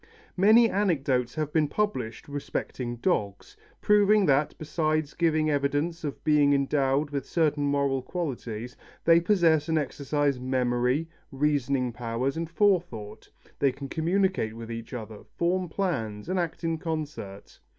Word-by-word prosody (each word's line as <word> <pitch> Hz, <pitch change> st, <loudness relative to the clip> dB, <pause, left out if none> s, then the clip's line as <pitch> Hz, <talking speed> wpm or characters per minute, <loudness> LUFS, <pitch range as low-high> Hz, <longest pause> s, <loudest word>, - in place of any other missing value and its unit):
Many 215 Hz, +5 st, +6 dB
anecdotes 140 Hz, -, 0 dB
have 155 Hz, -1 st, -3 dB
been 155 Hz, -2 st, +3 dB
published 175 Hz, -, -2 dB
respecting 135 Hz, -3 st, -4 dB
dogs, 105 Hz, -, -2 dB, 0.3 s
proving 210 Hz, 0 st, +4 dB
that, 145 Hz, 0 st, +2 dB
besides 155 Hz, -1 st, -1 dB
giving 155 Hz, -2 st, +1 dB
evidence 145 Hz, +4 st, -1 dB
of 145 Hz, -2 st, -5 dB
being 150 Hz, -2 st, +4 dB
endowed 140 Hz, +1 st, +1 dB
with 140 Hz, -2 st, -2 dB
certain 150 Hz, -1 st, 0 dB
moral 140 Hz, -2 st, +1 dB
qualities, 125 Hz, -7 st, -5 dB, 0.3 s
they 170 Hz, 0 st, +6 dB
possess 165 Hz, -5 st, +3 dB
and 160 Hz, -, +2 dB
exercise 145 Hz, -2 st, -1 dB
memory, 125 Hz, +3 st, 0 dB, 0.2 s
reasoning 135 Hz, -3 st, 0 dB
powers, 120 Hz, +3 st, -2 dB
and 165 Hz, 0 st, -3 dB
forethought; 175 Hz, -, 0 dB, 0.3 s
they 140 Hz, -2 st, +3 dB
can 135 Hz, +1 st, -8 dB
communicate 170 Hz, -, 0 dB
with 115 Hz, 0 st, -8 dB
each 115 Hz, 0 st, -7 dB
other, 110 Hz, -4 st, -7 dB, 0.2 s
form 180 Hz, +1 st, 0 dB
plans, 115 Hz, -, -2 dB
and 185 Hz, 0 st, 0 dB
act 170 Hz, 0 st, -3 dB
in 165 Hz, -1 st, -1 dB
concert. 150 Hz, -, -6 dB
145 Hz, 135 wpm, -27 LUFS, 125-165 Hz, 0.3 s, Many